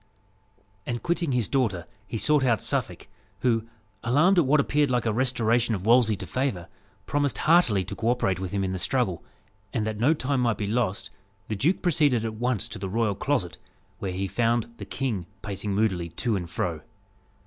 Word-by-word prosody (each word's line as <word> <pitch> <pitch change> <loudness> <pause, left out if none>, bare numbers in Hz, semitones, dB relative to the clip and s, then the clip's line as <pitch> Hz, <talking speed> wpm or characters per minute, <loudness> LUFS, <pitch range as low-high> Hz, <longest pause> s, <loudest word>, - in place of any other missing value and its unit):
And 120 -1 -3
quitting 170 -3 0
his 125 -5 +1
daughter, 110 -11 0 0.2
he 115 - -4
sought 150 +4 +3
out 120 -4 +3
Suffolk, - - -2 0.3
who, 115 -3 +1 0.4
alarmed 155 +11 +4
at 155 - +2
what 150 +2 +4
appeared 145 0 +2
like 125 -1 +1
a 110 - +1
restoration 120 -1 +1
of 95 0 -6
Wolsey 115 -1 +5
to 95 0 -7
favour, 125 -7 -2 0.4
promised 145 -6 0
heartily 155 - +4
to - - -7
co 115 - -3
operate 95 -7 +1
with 95 -2 -4
him 100 -1 -1
in 95 - -1
the 95 - -3
struggle; 95 -3 0 0.5
and 110 - -1
that 110 -1 -3
no 145 +8 +4
time 135 -2 -1
might 115 -3 +1
be 105 - -2
lost, 105 -2 -1 0.4
the 110 - -1
duke 155 - +1
proceeded 145 - +2
at 110 - -3
once 115 0 -1
to 110 0 -7
the 95 0 -4
royal 110 +1 +1
closet, 100 - -1 0.4
where 95 - -3
he 95 +2 -2
found 115 +3 0
the - - -7
king 110 -10 -3 0.2
pacing 100 -1 -3
moodily 95 -5 0
to 110 +7 -1
and 90 -3 -4
fro. 85 -3 -2
115 Hz, 190 wpm, -26 LUFS, 100-130 Hz, 0.5 s, Wolsey